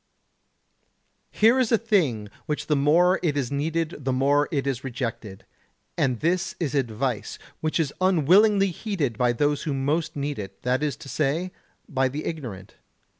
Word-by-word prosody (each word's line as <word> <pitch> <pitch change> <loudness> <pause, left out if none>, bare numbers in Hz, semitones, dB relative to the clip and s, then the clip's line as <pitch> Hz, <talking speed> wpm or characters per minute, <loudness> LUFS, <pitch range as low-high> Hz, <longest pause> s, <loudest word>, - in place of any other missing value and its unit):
Here 230 +4 +4
is 250 -4 +1
a 230 - +5
thing 160 - 0 0.2
which 150 -1 -2
the 150 - +1
more 170 +6 +4
it 155 -5 0
is 135 -3 -1
needed 155 +1 -2
the 130 - 0
more 140 +3 +2
it 140 -4 -1
is 135 -2 -2
rejected: 115 -6 -5 0.5
and 125 -4 0
this 175 +3 0
is 155 -7 -2
advice, 125 -3 -2 0.2
which 155 +2 -1
is 150 -4 0
unwillingly 190 +3 +4
heeded 165 - -2
by 120 +2 +2
those 145 +4 0
who 150 -4 -2
most 150 +4 -1
need 145 -2 -3
it, 95 -1 -8
that 125 +2 +1
is 150 -2 -1
to - - -12
say, 155 +6 -1 0.4
by 135 -4 +1
the 145 +4 -5
ignorant. 115 - -6
145 Hz, 165 wpm, -25 LUFS, 130-170 Hz, 0.5 s, a